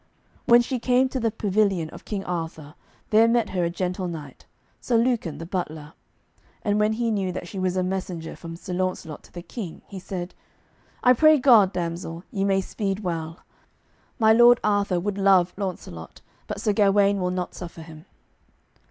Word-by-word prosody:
When 240 0 +6
she 255 +1 -3
came 255 +2 +2
to 260 - -3
the 230 -1 +1
pavilion 200 -6 0
of - - -12
King 200 -2 -4
Arthur 160 -4 -5 0.4
there 220 +1 +6
met 230 -2 +2
her 180 -2 0
a 170 - +1
gentle 180 +1 -3
knight, 160 -4 -9 0.3
Sir 240 - +1
Lucan 230 - 0
the 165 - -7
butler, 160 -4 -5 0.7
and 205 0 +1
when 210 +1 +2
he 230 0 -1
knew 195 -3 -1
that 180 -1 -6
she 195 - -6
was 185 0 0
a 185 - +1
messenger 180 -3 -4
from 165 -1 -8
Sir 180 +2 -7
Launcelot 180 -4 -3
to - - -20
the 175 - -8
King 190 -5 -7
he 195 - -8
said: 180 -1 -6 0.7
"I 250 - +7
pray 310 +4 +6
God, 235 -8 +6
damsel, 170 -1 -4
ye 195 -2 -1
may 195 -1 +2
speed 195 0 -3
well. 165 -3 -4 0.8
My 220 -2 +5
Lord 240 +1 +7
Arthur 200 -3 +1
would 200 +2 -3
love 190 -2 +4
Launcelot, 180 - -6 0.3
but - - -5
Sir 210 - +1
Gawaine 200 -1 +3
will 180 -1 0
not 180 -1 -3
suffer 170 -2 -9
him." 160 -1 -13
190 Hz, 180 wpm, -24 LUFS, 175-215 Hz, 0.8 s, I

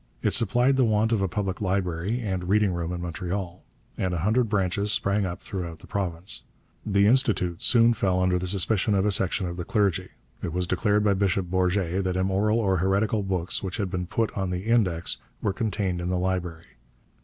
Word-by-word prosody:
It - - +2
supplied 125 +5 +3
the 130 - +4
want 110 0 +2
of 110 -4 +1
a 95 - +1
public 95 +1 -3
library 95 +3 -1
and 95 -4 -3
reading 105 -2 +3
room 85 -1 -3
in 90 -1 -4
Montreal, 90 +1 -4 0.4
and 90 -1 0
a 85 - -2
hundred 110 +5 +2
branches 100 0 0
sprang 100 -1 +1
up 85 - -5
throughout 85 -5 -5
the - - -15
province. 90 -2 -1 0.4
The 100 -1 +2
Institut 105 -8 +2
soon 120 -1 +5
fell 95 -4 0
under 90 -1 +2
the 90 - -3
suspicion 100 +2 +1
of 95 0 +2
a 105 - +2
section 95 +1 +1
of 85 0 -5
the 90 - -3
clergy. 100 -4 0 0.3
It 80 - -4
was 90 0 -1
declared 105 +3 +1
by 105 -1 +3
Bishop 95 -2 0
Bourget 95 0 +1
that 90 -1 -1
immoral 95 +4 +1
or 95 -4 +1
heretical 100 +4 +1
books 95 -3 -1
which 95 -2 -4
had 100 -4 -2
been 90 -1 -3
put 115 +4 -1
on 95 -2 -2
the 90 +2 -3
Index 100 -8 +1 0.2
were 100 - -1
contained 95 -5 -2
in 90 - -3
the 90 - 0
library. 90 -3 -3
95 Hz, 200 wpm, -26 LUFS, 90-105 Hz, 0.4 s, soon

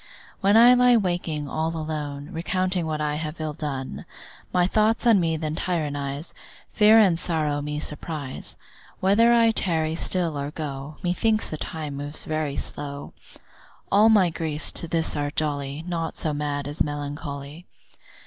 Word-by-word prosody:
When 200 +3 +4
I 240 +2 +8
lie 250 -1 +5
waking 175 -7 -2
all 160 +4 -2
alone, 150 -2 -5
Recounting 185 +1 -1
what 155 -1 -2
I 150 0 -1
have 155 +1 -5
ill 155 -1 -3
done, 140 -4 -5 0.5
My 180 -1 +3
thoughts 215 +5 +2
on 225 -4 +6
me 165 -2 0
then 155 -1 -3
tyrannise, 145 -3 -3 0.4
Fear 215 0 +6
and 190 -7 +5
sorrow 155 -4 -1
me 150 +1 -3
surprise, 150 -2 -5 0.4
Whether 210 +5 +4
I 230 -1 +5
tarry 160 -7 0
still 165 -2 0
or 140 +1 -3
go, 150 -1 -6
Methinks 215 +5 +1
the 155 - -3
time 150 -2 -5
moves 145 +2 -5
very 155 -2 -2
slow. 140 0 -6 0.8
All 210 +3 +6
my 195 -6 +5
griefs 160 -2 -1
to 170 - +1
this 165 0 0
are 145 -1 -1
jolly, 145 0 -2
Naught 165 -2 -3
so 155 - -1
mad 145 -1 -3
as 145 +2 -3
melancholy. 145 +2 -4
155 Hz, 155 wpm, -24 LUFS, 145-180 Hz, 0.8 s, I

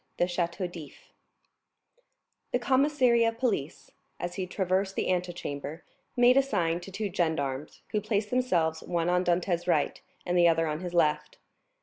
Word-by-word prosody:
The - - +3
Château 175 0 -2
d'If 160 -5 -12 1.4
The - - +2
commissary 260 -2 +3
of 230 0 0
police, 215 - -2 0.3
as 175 0 -4
he 185 0 -4
traversed 190 +1 -1
the - - 0
antechamber, 170 -4 -4 0.3
made 245 +1 +6
a - - +7
sign 175 -10 0
to 180 +2 -10
two 200 +1 -3
gendarmes, 150 -4 -2
who 210 - 0
placed 210 0 -1
themselves 175 -11 +1
one 170 -1 -1
on 180 0 +2
Dantès' 175 0 0
right 155 -5 +1 0.2
and 180 - -1
the 175 -1 +6
other 165 0 +3
on 155 -1 -2
his 175 -1 -5
left. 155 -3 +1
180 Hz, 155 wpm, -28 LUFS, 165-210 Hz, 1.4 s, a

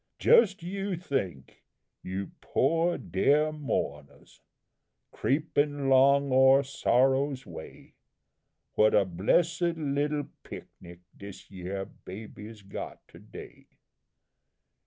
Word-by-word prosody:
"Just 195 -6 +4
you 195 +2 -3
think, 95 - -4 0.4
you 95 +1 -5
poor 165 +5 +1
deah 150 +2 +1
mounahs, 75 - -5 0.7
creepin' 145 -1 0
long 140 +1 +4
o'er 130 +1 +6
Sorrow's 135 0 +1
way, - - -11 0.8
What 110 0 +4
a 100 - +4
blessed 155 - +1 0.2
little 145 0 -1 0.2
pic - - -9
nic 85 0 -13
dis 100 0 -12
yere 95 +1 -5
baby's 105 +2 -11
got 95 - -8
to - - -15
day! - - -13
135 Hz, 95 wpm, -28 LUFS, 100-150 Hz, 0.8 s, o'er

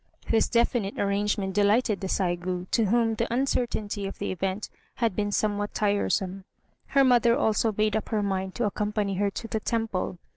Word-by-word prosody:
This 225 - +3
definite 235 -4 +1
arrangement 200 -1 0
delighted 210 +1 +2
the 190 - -2
Saigû, 180 -1 -1
to 230 - +3
whom 225 +2 +2
the 220 - -2
uncertainty 230 -5 -1
of 195 - -7
the - - -3
event 190 +2 -2 0.3
had 230 -6 0
been 205 -1 -1
somewhat 205 0 -1
tiresome. 195 -2 0 0.4
Her 275 - +4
mother 240 -2 +4
also 220 -4 +2
made 215 0 +2
up 220 - -2
her 215 -2 0
mind 190 -1 -2
to 240 - 0
accompany 210 0 -1
her 200 +1 +2
to 225 +3 -6
the 220 - -2
temple. 220 -5 -2
210 Hz, 175 wpm, -27 LUFS, 195-225 Hz, 0.4 s, Her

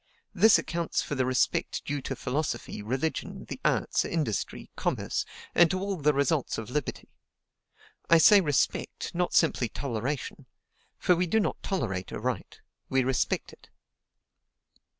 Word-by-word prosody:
This 210 +3 +6
accounts 170 0 -2
for - - -5
the 130 -2 0
respect 130 -1 0
due 145 -1 -2
to - - -4
philosophy, 145 -6 -3
religion, 130 +9 -3
the - - -7
arts - - +1
industry, 150 - -3
commerce, - - -1 0.3
and 175 -1 +6
to 185 - -1
all 200 +1 -2
the 150 -3 +2
results 140 0 0
of 110 +2 -6
liberty. 150 +1 -3 1.0
I 165 - +8
say 200 +5 +7
respect, 145 -6 -1
not 175 0 -1
simply 135 -7 +3
toleration; 130 +3 -4 0.5
for 180 - +3
we 180 +1 0
do 220 +6 +2
not 210 - -1
tolerate 95 - -2
a - - -4
right, - - -4 0.3
we 130 -1 +2
respect 130 0 -1
it." - - -19
150 Hz, 145 wpm, -28 LUFS, 130-175 Hz, 1.0 s, I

